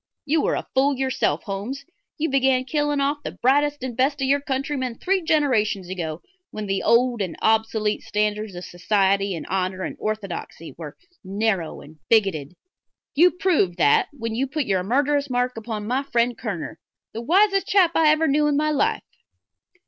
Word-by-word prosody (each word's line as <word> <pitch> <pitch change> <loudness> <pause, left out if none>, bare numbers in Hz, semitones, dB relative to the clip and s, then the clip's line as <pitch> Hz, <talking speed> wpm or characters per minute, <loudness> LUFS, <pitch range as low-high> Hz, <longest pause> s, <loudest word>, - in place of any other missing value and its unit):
You 300 +1 +1
are - - +1
a - - -4
fool 270 +1 +2
yourself, 265 0 0
Holmes; 210 +8 -5 0.3
you 315 - 0
began 265 -2 +2
killing 295 0 0
off 285 +1 0
the - - -5
brightest 290 +2 +2
and 255 -3 -4
best 275 +3 +1
of 270 - 0
our 285 0 +2
countrymen 265 -2 -2
three 380 +8 0
generations 235 - +1
ago, 165 -3 -5 0.3
when 215 -1 -6
the 195 -1 -1
old 240 -1 +3
and 185 -4 -3
obsolete 220 -1 +1
standards 210 -1 -2
of 175 - -7
society 195 +1 +1
and 165 - -6
honor 185 0 -2
and - - -4
orthodoxy 200 -6 -5
were 155 -3 -9 0.3
narrow 195 -3 -1
and 155 +2 -15
bigoted. 180 -9 +2 0.6
You 345 +5 +6
proved 330 - +1
that 145 - +4
when 230 -6 -5
you 260 +4 -1
put 290 +1 -2
your 190 -4 +1
murderous 280 +7 +1
mark 250 0 0
upon 220 -2 -5
my 250 +5 0
friend 240 -3 0
Kerner - - -5 0.3
the 225 - -5
wisest 390 - +3
chap 375 -4 +4
I 320 -2 +4
ever 310 +1 +3
knew 295 +2 +2
in 290 -1 +1
my 305 +1 +1
life." 435 +10 0
245 Hz, 175 wpm, -23 LUFS, 200-285 Hz, 0.6 s, You